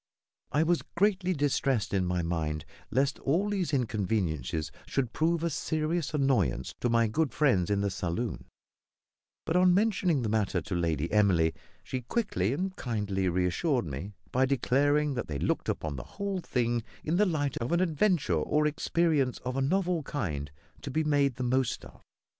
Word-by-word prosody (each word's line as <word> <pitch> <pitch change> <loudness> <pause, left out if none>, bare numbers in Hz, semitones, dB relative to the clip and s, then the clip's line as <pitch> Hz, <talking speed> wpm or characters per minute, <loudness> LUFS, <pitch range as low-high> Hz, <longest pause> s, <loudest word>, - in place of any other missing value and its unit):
I 150 - +3
was 170 +1 +2
greatly 190 0 +2
distressed 140 - 0
in 95 -2 +2
my 90 -1 0
mind 80 -2 -2 0.2
lest 135 +4 +1
all 185 +9 +1
these 190 -5 -1
inconveniences 95 - -1 0.2
should 125 -4 -1
prove 165 +1 +1
a 170 - +1
serious 155 +2 -1
annoyance 100 - +1
to 120 - 0
my 115 0 +4
good 150 +6 0
friends 125 - +2
in 100 -1 +1
the 100 -1 0
saloon; 90 +7 -3 1.0
but 160 - -1
on 180 0 +5
mentioning 190 - +2
the - - 0
matter 110 -2 +1
to 105 - -6
Lady 85 -1 -1
Emily, 90 -7 +4 0.3
she 130 - -4
quickly 120 - -1
and 185 +7 -2
kindly 100 -6 -1
reassured 95 - +1
me 80 +8 -6 0.2
by 130 +1 +3
declaring 145 +3 +2
that 125 -3 -3
they 75 -3 -3
looked - - -1
upon 75 -3 -2
the 60 - -5
whole 200 -2 -1
thing 120 -7 0 0.2
in 160 +3 0
the 210 - +5
light 145 -5 -1
of 115 +6 -3
an 170 - +3
adventure 175 - +2
or 150 - +1
experience 150 -3 +1
of 125 0 -2
a 135 - 0
novel 180 +3 +1
kind 85 - -3 0.3
to - - -6
be 155 +4 0
made 145 -4 +2
the 125 - -3
most 130 0 0
of. - - -15
130 Hz, 170 wpm, -29 LUFS, 95-160 Hz, 1.0 s, on